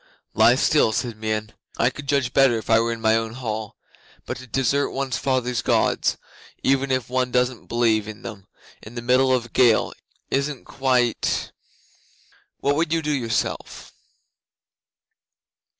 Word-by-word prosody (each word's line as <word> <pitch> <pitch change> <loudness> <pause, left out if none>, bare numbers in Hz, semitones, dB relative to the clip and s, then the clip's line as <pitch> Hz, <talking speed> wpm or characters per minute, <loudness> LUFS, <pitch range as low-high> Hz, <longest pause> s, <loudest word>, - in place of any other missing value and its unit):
'"Lie - - +5
still," 110 - +3
said 120 +1 -2
Meon. 110 0 -2 0.3
"I 120 +3 +2
could 145 +3 -10
judge 135 -3 +1
better 135 -4 +4
if 110 - -5
I 110 - +6
were 115 +1 0
in 115 -1 -5
my 110 0 +3
own 115 0 -2
hall. 110 -4 -5 0.5
But - - -4
to 130 - -11
desert 135 +3 +1
one's 135 -1 -2
fathers' 125 -3 0
Gods - - +1 0.5
even 135 0 +2
if 130 -3 0
one 130 0 0
doesn't 125 -1 0
believe 115 -3 +1
in 110 -1 -9
them 100 -4 -9 0.3
in 110 +3 -12
the 120 - -5
middle 130 +2 +3
of 125 -2 +1
a - - -13
gale, 115 -1 +3 0.4
isn't 140 -1 -1
quite 125 -3 0 1.1
What 140 - +2
would 165 0 0
you 165 -1 +1
do 150 - -1
yourself?" 120 -6 -3
125 Hz, 155 wpm, -23 LUFS, 115-135 Hz, 1.1 s, I